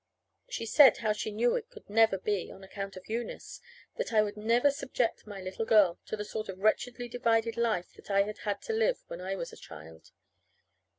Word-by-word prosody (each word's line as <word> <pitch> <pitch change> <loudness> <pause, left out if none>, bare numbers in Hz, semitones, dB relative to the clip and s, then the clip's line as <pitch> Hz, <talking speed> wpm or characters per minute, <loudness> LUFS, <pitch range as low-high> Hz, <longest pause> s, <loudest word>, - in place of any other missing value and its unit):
She 365 - -4
said 260 +1 +7
how 215 -2 +1
she 210 - -3
knew 235 +3 +2
it 470 -1 -4
could 460 -3 -15
never 220 -1 +4
be 195 -1 -2
on 195 - -12
account 195 0 -7
of 185 - -11
Eunice. 230 +2 -5 0.4
That - - -2
I 215 -2 +5
would 205 0 -4
never 235 +6 +3
subject 255 -5 -2
my 205 -2 -7
little 185 +3 -4
girl 205 -6 +4
to 215 - -3
the 210 - -4
sort 215 0 -5
of 190 - -5
wretchedly 240 +4 0
divided 230 -2 +1
life 225 -7 0
that - - -17
I 200 0 +4
had 210 +1 -6
had 205 -1 -3
to 455 - -3
live 470 +3 +1
when 170 - -6
I 190 +1 -3
was 170 -3 -6
a - - -11
child. 80 +1 -12
215 Hz, 215 wpm, -30 LUFS, 195-235 Hz, 0.4 s, said